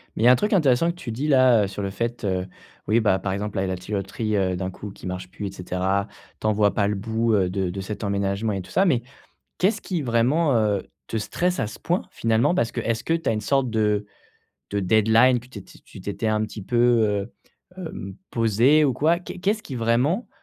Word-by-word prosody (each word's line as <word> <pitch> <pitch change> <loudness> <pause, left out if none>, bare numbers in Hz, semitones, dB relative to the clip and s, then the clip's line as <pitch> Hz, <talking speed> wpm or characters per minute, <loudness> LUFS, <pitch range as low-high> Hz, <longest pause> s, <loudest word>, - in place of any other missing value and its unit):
Mais - - -1
il - - +5
y - - +7
a - - +9
un - - +7
truc 210 - 0
intéressant 160 -2 +3
que - - -12
tu 130 -9 -6
dis 130 +7 -3
là, 130 -6 +5
heu, - - 0
sur 100 +1 -6
le 100 - -2
fait, 115 +4 -3
heu, 95 -2 -1 0.4
oui, 110 +2 +4
bah, 100 -3 +2
par 95 - -2
exemple 105 +1 -4
la, 95 - +1
il - - -1
y - - -3
a - - -1
la - - -4
tuyauterie, 105 +3 -3
heu, 95 -2 +1
d'un 95 +1 -3
coup 100 +2 -8
qui 95 - -10
marche 90 0 -5
plus 100 +2 -6
et - - -6
cetera. 95 +2 -1 0.3
Tu - - -2
en 110 - +3
vois 105 -1 +2
pas 100 -2 +1
le 105 - 0
bout, 110 +3 0
heu, 95 -3 +2
de 95 0 -1
de 95 +2 -5
cet 105 +3 -6
emménagement 100 +1 -1
et 95 - -3
tout 90 - -13
ça, 190 - +3
mais 135 -10 +2 0.6
qu'est-ce 195 +5 +1
qui 180 -4 -2
vraiment, 130 +6 +2
heu, 105 -3 +1 0.2
te 115 - -2
stresse 180 +11 -1
à - - +1
ce 105 - -10
point 175 +3 0
finalement? 115 +7 +2
Parce 115 -9 0
que, - - -4
est-ce 115 0 -1
que 165 - 0
tu 165 - -4
as - - +2
une 105 - -2
sorte 135 +3 +1
de 105 -2 +1 0.7
de 100 - -1
deadline 110 +5 +4
que 125 - -17
t 105 -6 -9
tu - - -17
tu - - -13
t'étais 100 +3 -3
un 110 0 +1
petit 110 -1 -6
peu, 120 +5 -3
heu, 115 -3 +2 0.5
hem, 160 - -6 0.2
posé 120 +7 +4
ou 135 - +3
quoi? 160 +7 +2
Qu'est 180 - -8
qu'est-ce 210 +3 0
qui 135 - -7
vraiment 125 - +1
110 Hz, 255 wpm, -24 LUFS, 100-125 Hz, 0.7 s, a